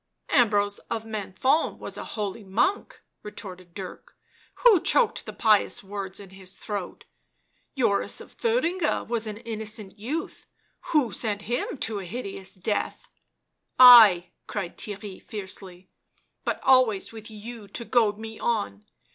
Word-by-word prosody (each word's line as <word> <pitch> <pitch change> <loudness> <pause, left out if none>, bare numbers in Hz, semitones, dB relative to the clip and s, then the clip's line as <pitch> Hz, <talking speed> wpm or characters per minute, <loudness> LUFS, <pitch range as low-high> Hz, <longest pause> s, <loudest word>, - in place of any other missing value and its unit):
" - - -45
Ambrose 205 -3 +1
of 225 -1 -3
Menthon 220 - 0
was - - -7
a - - -5
holy 210 0 -4
monk," 225 - 0 0.2
retorted 185 -4 -10
Dirk. 190 -2 -9 0.2
" - - -32
Who 440 -9 +7
choked - - +2
the - - -4
pious 215 -3 +2
words 195 -1 -5
in 195 -2 -12
his 190 -1 -10
throat? 205 -4 -6 0.7
Joris 205 -6 +1
of - - -12
Thuringia 375 -8 0
was 230 -2 -2
an 210 -1 -5
innocent 220 -3 -6
youth 290 +10 -5 0.2
— - - -43
who 280 -8 +3
sent 205 -2 -1
him 240 +5 -2
to 220 -2 -1
a 190 - -7
hideous 195 -1 -6
death?" 205 +3 -2 0.4
" - - -47 0.2
I 180 -4 +1
!" - - -51
cried 190 -4 -4
Theirry 205 -2 -6
fiercely; 190 -3 -7 0.2
" - - -43
but - - -1
always 255 -7 +4
with 220 -1 -9
you 220 0 -9
to 235 +4 -5
goad 220 -5 +2
me 220 0 -8
on 105 - -2
210 Hz, 155 wpm, -26 LUFS, 195-235 Hz, 0.7 s, Who